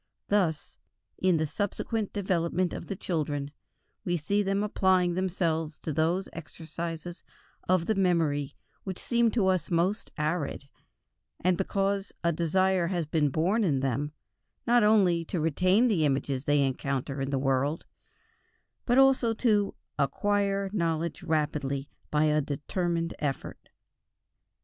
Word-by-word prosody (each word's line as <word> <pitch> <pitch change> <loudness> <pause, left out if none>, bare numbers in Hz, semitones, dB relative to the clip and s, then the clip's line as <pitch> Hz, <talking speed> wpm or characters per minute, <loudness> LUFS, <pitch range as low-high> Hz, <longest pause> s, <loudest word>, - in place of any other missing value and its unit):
Thus, 180 -7 0 0.4
in 185 -2 +3
the 155 - +1
subsequent 205 +5 -2
development 180 -2 0
of - - -6
the 200 - -3
children, 145 -6 -2 0.5
we 175 -1 0
see 200 +7 0
them 195 0 0
applying 185 -4 +2
themselves 170 -4 -1
to 155 - -4
those 170 +5 +1
exercises 165 +1 -7 0.5
of 185 -2 +3
the 220 - +2
memory 160 -7 +1 0.3
which 190 -2 -5
seem 235 -1 +2
to 220 -6 +2
us 185 -4 +1
most 180 +5 0
arid, 150 -2 -2 0.9
because 195 +1 -1
a 170 - +3
desire 175 +2 +1
has 175 -2 -1
been 150 -1 +1
born 185 - +1
in 140 -8 +1
them, 135 +3 -1 0.5
not 240 -1 +4
only 190 -6 +4
to 175 - -3
retain 185 - +3
the 190 -9 +2
images 135 -1 0
they 145 -1 +3
encounter 135 0 -2
in 135 - -2
the 140 - 0
world, 135 +3 0 1.0
but 245 +1 +3
also 265 -4 +4
to 210 -4 +2 0.2
"acquire 200 +6 +1
knowledge 170 -3 -1
rapidly" 150 -4 -1 0.2
by 150 0 +2
a 150 0 +3
determined 165 +4 -2
effort. 140 -3 -4
170 Hz, 130 wpm, -28 LUFS, 150-195 Hz, 1.0 s, not